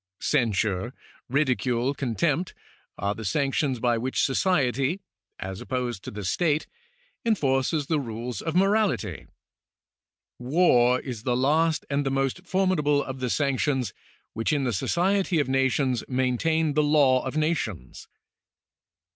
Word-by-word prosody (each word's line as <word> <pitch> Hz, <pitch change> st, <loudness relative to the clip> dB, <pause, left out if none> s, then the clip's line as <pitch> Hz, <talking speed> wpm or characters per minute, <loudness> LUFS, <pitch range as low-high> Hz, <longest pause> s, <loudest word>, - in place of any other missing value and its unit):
Cen 120 Hz, -7 st, +1 dB
sure, 100 Hz, +3 st, -1 dB, 0.3 s
ridicule, 130 Hz, -2 st, +1 dB
contempt, 145 Hz, +6 st, -1 dB, 0.4 s
are 100 Hz, +1 st, -1 dB
the 110 Hz, -, -8 dB
sanctions 135 Hz, +4 st, 0 dB
by 120 Hz, -1 st, +1 dB
which 130 Hz, +3 st, 0 dB
society 140 Hz, -, +1 dB, 0.4 s
(as 95 Hz, +1 st, -6 dB
opposed 125 Hz, -6 st, -3 dB
to -, -, -6 dB
the 105 Hz, -2 st, -7 dB
state) 155 Hz, -, +1 dB, 0.6 s
enforces 145 Hz, -, +1 dB
the 155 Hz, +1 st, 0 dB
rules 120 Hz, -1 st, -5 dB
of 160 Hz, 0 st, -3 dB
morality. 195 Hz, -, +1 dB, 1.1 s
War 125 Hz, -3 st, +3 dB
is 120 Hz, -5 st, -6 dB
the 120 Hz, +1 st, 0 dB
last 155 Hz, +5 st, +2 dB
and 140 Hz, 0 st, 0 dB
the 135 Hz, -, -1 dB
most 135 Hz, +6 st, -2 dB
formidable 170 Hz, -7 st, +2 dB
of 130 Hz, 0 st, -6 dB
the 125 Hz, -1 st, -2 dB
sanctions 135 Hz, -2 st, 0 dB, 0.4 s
which 115 Hz, +5 st, -1 dB
in 145 Hz, -2 st, +1 dB
the 125 Hz, -3 st, 0 dB
society 180 Hz, -, +1 dB
of 145 Hz, -, +1 dB
nations 130 Hz, -1 st, +1 dB
maintain 145 Hz, +5 st, +1 dB
the 150 Hz, -, +3 dB
law 145 Hz, -4 st, +4 dB
of 135 Hz, +3 st, -4 dB
nations. 145 Hz, -, -2 dB
135 Hz, 130 wpm, -26 LUFS, 120-155 Hz, 1.1 s, law